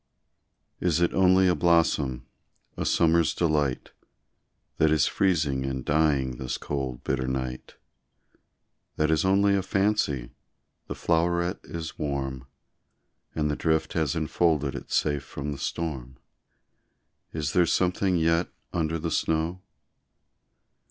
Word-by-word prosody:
Is 85 -3 +1
it 85 - +2
only 95 0 +4
a 90 - +4
blossom, 80 -7 +2 0.5
a - - -2
summer's 85 -1 +3
delight, 75 -6 0 0.9
That 80 - +4
is 75 -3 +3
freezing 75 -9 +1
and 65 -1 -4
dying 70 -5 +1
this 65 -2 -3
cold, 65 -3 -4
bitter 65 -1 -1
night? 65 -1 -4 1.2
That 75 0 +1
is 80 - +2
only 100 +1 +3
a 100 - +1
fancy, 95 - 0 0.6
the - - -5
floweret 85 +2 0
is 80 -1 -7
warm, 65 -3 -3 0.9
And 75 -1 0
the - - -1
drift 80 0 0
has 80 -4 0
enfolded 80 -3 +1
it - - -8
safe 75 -2 +1
from 70 +1 -6
the 70 - -6
storm 65 -5 -4 1.1
Is 75 -2 -3
there 90 -1 +4
something 90 +2 +1
yet 85 +1 +2 0.2
under 80 0 0
the 80 +1 -3
snow? 80 +4 -1
80 Hz, 125 wpm, -26 LUFS, 70-85 Hz, 1.2 s, only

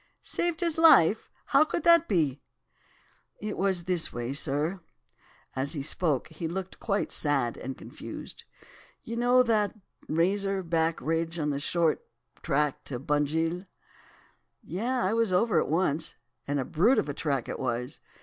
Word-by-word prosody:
"'Saved 345 0 -1
his 335 -2 0
life? 225 - +6 0.2
How 275 - +5
could 310 - -3
that 335 -1 +6
be?' 150 - +1 1.0
"'It 210 0 -4
was 190 -2 +1
this 180 -2 +1
way, 120 +2 -4
sir.' 150 +5 0 0.8
As 135 +4 0
he 145 -4 -3
spoke, 150 -2 0
he 160 +1 -5
looked 190 +2 -5
quite 205 -2 -1
sad 140 -6 0
and 130 +1 -6
confused. - - -9 0.6
'You 230 - -5
know 245 +1 +4
that 215 -3 +1 0.3
Razor 195 +4 +1
Back 165 -1 0
ridge 165 +1 -1
on 150 -2 0
the 140 - -2
short 165 +1 +1 0.4
track 150 -2 0
to 130 - -4
Bunjil?' 160 +6 -1 1.0
"'Yes! 240 +8 -1
I 190 - +1
was 230 -3 +2
over 210 +5 +3
it - - 0
once, 160 -1 0 0.3
and 145 0 0
a 130 - -1
brute 210 - +3
of - - +1
a 145 - -3
track 140 -4 -2
it - - -5
was. 125 +2 -3
165 Hz, 155 wpm, -28 LUFS, 145-205 Hz, 1.0 s, life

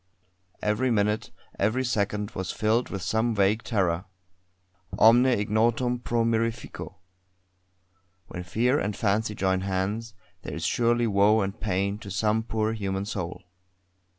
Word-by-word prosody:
Every 105 +5 +1
minute, 105 -1 +1 0.3
every 115 +6 +1
second, 105 -2 -1
was 95 -3 -4
filled 110 +3 +1
with 95 -2 -5
some 110 +1 0
vague 100 +2 +2
terror. 95 -6 0 0.9
Omne 120 +3 +6
ignotum 120 +2 +1
pro 120 -1 0
mirifico. 115 0 -2 1.3
When 90 - -7
Fear 115 - +1
and 105 0 -2
Fancy 105 0 0
join 95 -1 +1
hands, 100 +4 -2 0.3
there - - -6
is - - -4
surely 120 0 +2
woe 105 +1 +4
and 100 +2 -3
pain 100 0 -1
to 100 - -9
some 110 +3 +1
poor 110 -1 -1
human 100 -2 -3
soul. 90 -4 -5
110 Hz, 130 wpm, -26 LUFS, 100-115 Hz, 1.3 s, Omne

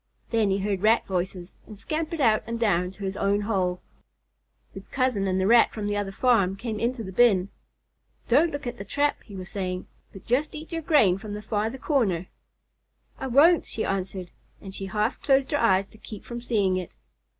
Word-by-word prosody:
Then 225 -3 +2
he 195 - +1
heard 195 -1 -2
Rat 220 +3 +3
voices 180 -1 -3
and 215 - -11
scampered 315 - -3
out 225 -6 +4
and 230 0 -3
down 180 -6 +2
to 195 +2 -11
his 195 0 -3
own 200 +1 +1
hole. 185 -4 -1 0.9
His - - -10
cousin 255 -7 0
and 185 0 0
the 190 - +1
Rat 230 +3 +5
from 215 -2 -4
the 205 0 -1
other 205 -1 -2
farm 200 -4 +2
came 220 +1 -5
into 235 0 -1
the 190 - -7
bin. 195 -3 +4 0.8
"Don't 335 +2 +4
look 285 -1 -5
at 245 - -5
the - - -4
trap," 285 +8 0
he 205 - -12
was 185 -1 -7
saying, 185 -2 -4 0.3
"but 195 - -13
just 275 +7 0
eat 310 +3 -9
your 330 -1 -3
grain 250 - +3
from 205 0 -6
the 210 - -6
farther 220 +3 -2
corner." 220 - 0 0.9
"I 265 - -3
won't," 305 +7 +5
she 220 - -3
answered, 185 -2 -3 0.3
and 190 -1 -10
she 195 0 -5
half 210 +5 -1
closed 270 0 +2
her 290 - +1
eyes 195 -4 +3
to 215 - -18
keep 210 -2 -10
from 240 0 -6
seeing 205 -6 +1
it. 180 -2 -4
210 Hz, 205 wpm, -26 LUFS, 190-245 Hz, 0.9 s, Rat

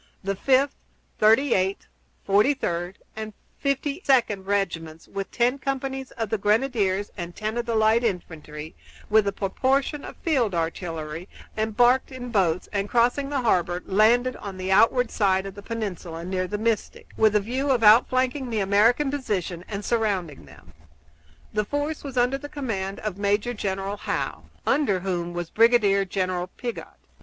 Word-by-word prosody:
The 195 +1 -1
Fifth, 270 +6 +3 0.5
Thirty 225 +5 +5
eighth, 190 +1 0 0.4
Forty 210 +9 +3
third, 175 -5 -3 0.2
and 215 -1 -6 0.3
Fifty 280 +3 -1
second 235 -8 +2
regiments, 165 -6 -2
with 195 -1 -5
ten 250 +3 +1
companies 270 -1 -3
of 225 -3 -3
the 220 - 0
grenadiers 205 -2 +1
and 175 -2 -6
ten 215 +1 -3
of 240 0 -2
the 230 - 0
light 220 +2 +4
infantry, 160 -6 -4 0.4
with 215 -1 +5
a - - +2
proportion 265 +9 0
of - - -8
field 250 - +1
artillery, 165 0 -4 0.3
embarked 240 +5 +2
in 250 -2 -7
boats, 180 -5 +1
and, 200 0 -1
crossing 245 +5 +2
the 280 -2 -1
harbor, 180 -5 +1
landed 235 +6 +3
on 195 -2 -7
the 185 +1 -3
outward 230 +4 +4
side 190 -2 +2
of 195 - -6
the 205 - -10
peninsula, 185 -7 -5
near 185 0 -2
the 210 - -3
Mystic, 220 0 -2
with 215 -1 +3
a - - +6
view 255 +7 -2
of 250 -4 +2
outflanking 255 +4 +4
the 225 -2 -1
American 220 +8 +3
position 190 -11 -3
and 205 -1 -5
surrounding 195 - -1
them. - - -17 0.8
The 210 - +1
force 290 +6 -3
was 275 -3 -7
under 250 +3 +2
the 290 +1 -8
command 200 -10 -4
of 205 -3 -4
Major 205 +4 +1
General 195 -1 -3
Howe, - - -3 0.2
under 205 -11 +2
whom 175 -2 -2
was 175 -1 -5
Brigadier 215 -4 +4
General 185 -1 -2
Piggott. 240 +5 -6
210 Hz, 160 wpm, -25 LUFS, 190-245 Hz, 0.8 s, a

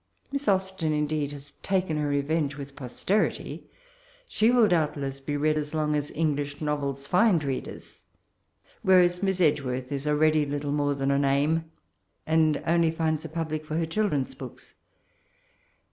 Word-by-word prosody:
Miss 280 0 -3
Austen, 190 -5 +1
indeed, 150 -1 -1
has 145 0 -9
taken 185 -4 0
her 150 -1 0
re 145 0 +1
venge 145 -1 -1
with 140 -1 -8
posterity. 150 - -2 0.6
She 220 - +2
will 240 -3 +5
doubt 160 -5 +1
less 135 -1 -4
be 145 +2 -3
read 155 +1 +1
as 150 +1 -5
long 150 -1 +1
as 145 -1 -1
Englbh 145 -2 -1
novels 140 -2 -2
find 180 0 +3
readers; 135 -2 -5 0.8
whereas 180 -1 +4
Miss 190 -2 0
Edge 150 -4 +3
worth 130 0 -4
is 140 +1 -3
already 155 +1 +3
little 145 0 -3
more 145 -1 +1
than 135 0 0
a 140 - +2
name, 145 +4 +2 0.6
and 160 -2 +2
only 170 0 +3
finds 160 -1 -1
a - - -5
public 155 -1 -3
for 155 +1 -3
her 165 - +1
children's 165 -6 -1
books. - - -11
150 Hz, 160 wpm, -27 LUFS, 145-165 Hz, 0.8 s, will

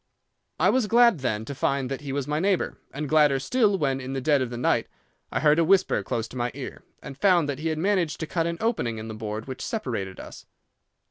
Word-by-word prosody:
I - - +4
was 255 -4 +1
glad, 235 -5 +5
then, 110 -4 -2
to 140 - -5
find 135 0 0
that 135 - -3
he 140 -2 -5
was 140 0 -2
my 150 +1 0
neighbour, 190 +1 0 0.2
and 150 +2 -4
gladder 150 -2 +4
still 205 - +2
when, 135 -5 0
in 130 +1 -5
the 135 - -1
dead 145 +1 +2
of 130 - -1
the 120 - -6
night, 120 - +1 0.4
I - - -1
heard 150 +1 +4
a - - +5
whisper 185 - +3
close 110 +3 -3
to - - -12
my 120 0 0
ear, - - -7 0.2
and 140 - -8
found 175 0 +3
that 140 -1 -3
he 160 - -2
had 160 -1 -1
managed 180 -2 0
to - - -1
cut 165 +1 -1
an 170 0 -3
opening 200 - 0
in 110 +1 -6
the - - -5
board 110 0 -5
which 130 -1 -7
separated 115 - -4
us. - - -11
145 Hz, 245 wpm, -25 LUFS, 130-175 Hz, 0.4 s, glad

